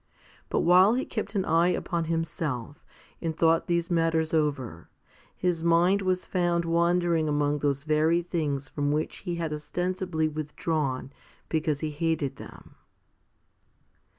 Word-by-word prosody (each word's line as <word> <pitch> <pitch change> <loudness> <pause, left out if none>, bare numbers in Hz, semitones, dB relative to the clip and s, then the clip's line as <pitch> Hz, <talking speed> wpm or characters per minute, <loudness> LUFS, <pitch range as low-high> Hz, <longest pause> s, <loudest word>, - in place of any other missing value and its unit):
But - - +1
while 185 +6 +6
he 260 - -1
kept 215 -1 -4
an 190 -2 +1
eye 165 +2 +3
upon 170 -1 -1
himself 155 -5 -3 0.4
and 165 -2 -3
thought 165 0 +3
these 170 +1 0
matters 165 -1 +1
over, 140 - -1 0.5
his 175 -3 -1
mind 175 +4 +4
was 185 -1 0
found 175 -2 0
wandering 170 -1 +2
among 145 0 +1
those 140 -1 0
very 155 +3 +2
things 150 -5 -2
from 145 +1 -1
which 150 +1 -1
he 175 -3 -4
had 165 -2 -3
ostensibly 175 +1 -2
withdrawn 150 -3 -3 0.4
because 155 -2 0
he 155 -1 -2
hated 160 -2 -1
them. - - -12
165 Hz, 135 wpm, -27 LUFS, 150-175 Hz, 0.5 s, while